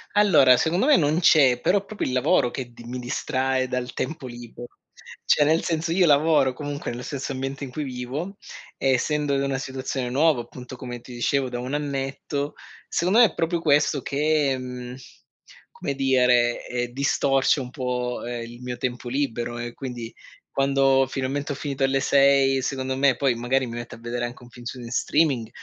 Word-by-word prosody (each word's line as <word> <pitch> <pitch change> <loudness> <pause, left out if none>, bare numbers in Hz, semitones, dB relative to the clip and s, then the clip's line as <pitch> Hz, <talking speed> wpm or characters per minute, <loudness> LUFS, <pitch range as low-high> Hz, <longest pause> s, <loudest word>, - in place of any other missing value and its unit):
Allora, 155 -12 +6
secondo 175 - +1
me 300 - +7
non 155 - +2
c'è, 140 -8 +5
però 195 +2 +2
proprio 215 - -4
il 130 - -3
lavoro 130 0 +3
che 125 -2 -6
di 120 - -13
mi 125 +1 -5
distrae 130 +1 -1
dal 125 0 -3
tempo 135 0 -4
libe 120 0 -9 0.6
cioè 150 - +4
nel 160 +2 +2
senso, 165 0 -1
io 180 0 +4
lavoro 145 -3 +4
comunque 145 +1 -5
nello 120 +1 -6
stesso 140 +1 -4
ambiente 135 +1 -4
in 135 - -5
cui 150 +4 -4
vivo, 135 +9 -5 0.4
e 135 - +1
essendo 150 +2 0
in 135 - +1
una 135 -1 -1
situazione 130 -1 -4
nuova, 140 0 +3
appunto, 125 +2 -10
come 120 -1 -7
ti 125 - -12
dicevo 130 +2 0
da 120 - -4
1 125 +3 -5
annetto, 140 0 -3 0.3
secondo 185 +7 +2
me 240 - +9
è 195 - -1
proprio 165 0 -1
questo 145 -1 +3
che, 145 -1 +1
mhmm, 125 -1 -7 0.8
come 140 - -4
dire, 125 -3 +3
ehm, 120 -1 -3
distorce 135 0 +2
un 125 -2 -5
po', 125 -1 -3
ehm, 120 -1 -4
il 120 +1 -12
mio 125 0 -5
tempo 125 -1 -4
libero. 120 -3 -2
E 120 0 -5
quindi, 120 -4 -7 0.4
quando 135 -1 +3
finalmente 135 +2 -3
ho 140 - -2
finito 140 -1 -3
alle 135 0 +2
6, 135 -1 +4
secondo 130 0 -2
me, 135 -1 +4
poi 130 -1 +1
magari 125 +2 0
mi 115 - -6
metto 120 0 -7
a - - -15
vedere 120 +1 -3
anche 120 +1 -8
un 120 - -14
film 120 0 -13
su 125 +2 -6
n 120 - -8
streaming, 135 -3 +1
135 Hz, 190 wpm, -24 LUFS, 125-145 Hz, 0.8 s, me